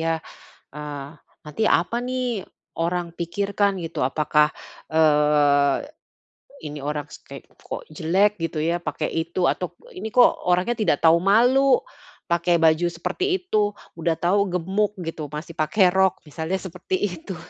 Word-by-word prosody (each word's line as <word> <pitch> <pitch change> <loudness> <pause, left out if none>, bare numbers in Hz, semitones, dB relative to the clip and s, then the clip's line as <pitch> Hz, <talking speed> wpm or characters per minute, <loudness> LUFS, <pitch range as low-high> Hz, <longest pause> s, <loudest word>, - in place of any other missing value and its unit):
ya, 165 0 +1 0.6
"Eee, 145 -2 -6 0.4
nanti 150 +9 -3 0.2
apa 235 - -3
nih 250 -5 -2 0.3
orang 170 0 -2
pikirkan?" 200 +3 -1
Gitu. 165 -6 -3
Apakah, 150 +2 +2 0.4
eee, 150 -2 +4 0.9
"Ini 150 -1 -6
orang 150 +1 -3
ste - - -11 0.2
kok - - -7
jelek 195 +4 +1
gitu 165 -1 -3
ya 170 +2 0
pakai 155 -2 -3
itu," 170 +2 -1
atau, 175 -2 -5 0.2
"Ini 205 +4 -5
kok 245 -1 +7 0.2
orangnya 180 +7 +2
tidak 175 -9 +2
tahu 165 +1 +6
malu 250 +7 +4 0.4
pakai 170 0 +2
baju 165 +1 +4
seperti 170 - -3
itu. 215 - 0 0.3
Udah 165 0 +1
tahu 200 +3 +2
gemuk 190 +4 0
gitu 160 -2 -5
masih 155 +2 -7
pakai 180 +4 +3
rok," 190 0 +2
misalnya 160 +5 -3
seperti 185 0 -4 0.2
itu. 190 +2 -7
170 Hz, 135 wpm, -23 LUFS, 155-200 Hz, 0.9 s, kok